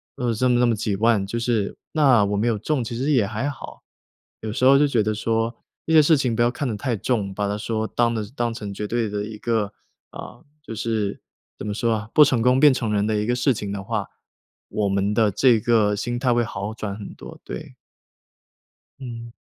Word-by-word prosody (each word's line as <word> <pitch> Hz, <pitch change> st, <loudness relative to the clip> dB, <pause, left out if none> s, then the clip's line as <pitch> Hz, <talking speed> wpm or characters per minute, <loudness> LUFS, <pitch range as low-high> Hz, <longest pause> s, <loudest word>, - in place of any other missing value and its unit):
呃， 125 Hz, -4 st, -1 dB
这 125 Hz, +4 st, +1 dB
么 120 Hz, -1 st, +3 dB
这 125 Hz, -, +4 dB
么 115 Hz, -, +2 dB
几 105 Hz, -1 st, -2 dB
万， 110 Hz, -1 st, +3 dB
就 115 Hz, -, -3 dB
是， 115 Hz, -4 st, -1 dB, 0.2 s
那 135 Hz, -9 st, +4 dB
我 100 Hz, +1 st, -1 dB
没 110 Hz, +4 st, +1 dB
有 115 Hz, -2 st, +1 dB
中 130 Hz, +5 st, -1 dB
其 115 Hz, 0 st, -5 dB
实 135 Hz, +5 st, 0 dB
也 125 Hz, -8 st, +3 dB
还 110 Hz, +6 st, -3 dB
好。 140 Hz, -, -10 dB, 0.6 s
有 110 Hz, -1 st, -4 dB
时 125 Hz, -, -3 dB
候 135 Hz, +1 st, +7 dB
就 145 Hz, -, +4 dB
觉 120 Hz, -6 st, +1 dB
得 110 Hz, +1 st, 0 dB
说， 115 Hz, +2 st, -1 dB, 0.3 s
这 -, -, -3 dB
些 155 Hz, -, +8 dB
事 155 Hz, +2 st, +5 dB
情 125 Hz, -3 st, 0 dB
不 120 Hz, -, 0 dB
要 120 Hz, -, +4 dB
看 140 Hz, +3 st, -4 dB
得 110 Hz, -4 st, -3 dB
太 125 Hz, 0 st, -1 dB
重， 105 Hz, -3 st, -1 dB
把 100 Hz, +1 st, -2 dB
它 105 Hz, -, -2 dB
说 110 Hz, +1 st, -2 dB
当 120 Hz, 0 st, +1 dB
的 110 Hz, -2 st, -2 dB
当 120 Hz, -2 st, -1 dB
成 105 Hz, -3 st, -6 dB
绝 105 Hz, +1 st, -4 dB
对 115 Hz, 0 st, -1 dB
的 105 Hz, 0 st, -3 dB
一 110 Hz, 0 st, -8 dB
个， 110 Hz, -2 st, -1 dB, 0.4 s
啊， -, -, -10 dB, 0.2 s
就 115 Hz, -, -8 dB
是， 110 Hz, -2 st, -2 dB, 0.4 s
怎 -, -, -6 dB
么 105 Hz, -, -2 dB
说 115 Hz, +2 st, 0 dB
啊， 105 Hz, 0 st, -6 dB
“不 150 Hz, -, +9 dB
成 130 Hz, -5 st, +2 dB
功， 125 Hz, +2 st, +4 dB
便 145 Hz, -1 st, +7 dB
成 115 Hz, -4 st, -2 dB
仁” 100 Hz, 0 st, +1 dB
的 110 Hz, -1 st, 0 dB
一 105 Hz, -, -1 dB
个 120 Hz, +2 st, +1 dB
事 125 Hz, +2 st, +2 dB
情 105 Hz, -3 st, -5 dB
的 100 Hz, -1 st, -4 dB
话， 105 Hz, -1 st, -3 dB, 0.6 s
我 105 Hz, -1 st, -1 dB
们 100 Hz, +1 st, 0 dB
的 110 Hz, -1 st, +3 dB
这 115 Hz, +3 st, +4 dB
个 105 Hz, -2 st, +2 dB
心 120 Hz, +4 st, -3 dB
态 125 Hz, -1 st, +2 dB
会 120 Hz, -, +2 dB
好 105 Hz, -1 st, -5 dB
转 105 Hz, -3 st, -5 dB
很 105 Hz, -, -8 dB
多， -, -, -11 dB
对。 -, -, -8 dB, 1.2 s
嗯。 115 Hz, -3 st, -8 dB
115 Hz, 255 characters per minute, -23 LUFS, 105-120 Hz, 1.2 s, 不